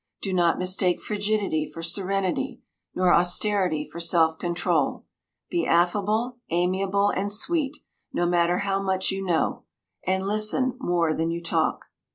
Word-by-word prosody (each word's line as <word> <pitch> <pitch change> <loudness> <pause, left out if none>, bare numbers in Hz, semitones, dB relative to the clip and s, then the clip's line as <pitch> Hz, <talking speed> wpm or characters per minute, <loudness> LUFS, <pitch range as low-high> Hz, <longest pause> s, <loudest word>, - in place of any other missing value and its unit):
Do 195 - -2
not 175 -2 +3
mistake 185 -1 +1
frigidity 205 -6 -1
for 165 - -8
serenity, 195 +8 -1 0.4
nor 180 -1 +3
austerity 180 -3 +2
for 170 - -9
self 165 -1 +2
control. 175 -1 -1 0.5
Be 345 - 0
affable, 210 +8 +1
amiable, 190 +4 +1
and 200 +2 -1
sweet, 295 +6 0 0.3
no 175 - 0
matter 175 0 +2
how 195 0 0
much 190 -1 0
you 195 0 -3
know. 175 -4 0 0.5
And 190 +1 0
listen 215 +5 +1
more 170 - +1
than 160 +1 -1
you 170 0 -4
talk. 165 -1 0
185 Hz, 140 wpm, -25 LUFS, 170-205 Hz, 0.5 s, not